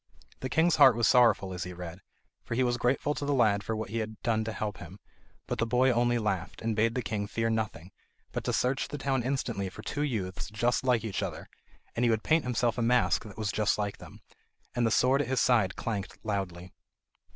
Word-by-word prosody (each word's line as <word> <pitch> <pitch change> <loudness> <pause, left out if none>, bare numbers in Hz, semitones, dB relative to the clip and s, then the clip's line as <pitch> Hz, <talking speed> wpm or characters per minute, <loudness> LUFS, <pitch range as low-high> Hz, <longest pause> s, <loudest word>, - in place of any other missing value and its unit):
The 130 - -4
king's 160 +5 +3
heart 130 - +8
was 115 0 +2
sorrowful 115 -6 +4
as 90 -1 -4
he 90 0 -6
read, 90 +1 -8 0.4
for 115 - -4
he 130 - +2
was 120 -1 +1
grateful 135 +4 +1
to 145 - -5
the 145 0 +1
lad 105 -5 +3
for 110 +3 -2
what 110 -2 -5
he 115 - -1
had 110 -2 -5
done 110 -2 +1
to 110 - -3
help 105 -1 -4
him; 90 +2 -10 0.5
but - - -4
the 115 - +2
boy 125 +2 +3
only 120 0 +2
laughed, 95 -5 -3
and 115 -1 0
bade 115 +2 +2
the 125 - -1
king 100 0 -2
fear 115 +2 -1
nothing, 105 -6 -3 0.4
but - - -3
to - - +1
search 130 +2 0
the 145 - -6
town 135 -2 0
instantly 120 -6 -2
for 105 +3 -11
two 145 - -3
youths 110 -12 -3
just 120 +3 0
like 125 -4 +2
each 110 -4 -3
other, - - -5 0.5
and 120 - 0
he 120 - +4
would 110 -1 +1
paint 160 -2 +2
himself 120 -1 0
a - - +1
mask 120 0 +2
that 105 - -11
was 105 -3 -1
just 105 +1 +1
like 100 -1 -3
them. - - -13 0.5
And 120 -1 +1
the - - +2
sword 130 +5 +3
at - - -3
his 130 0 0
side 115 -6 +3
clanked 100 -5 -4
loudly. 95 -4 -4
115 Hz, 230 wpm, -29 LUFS, 100-125 Hz, 0.5 s, heart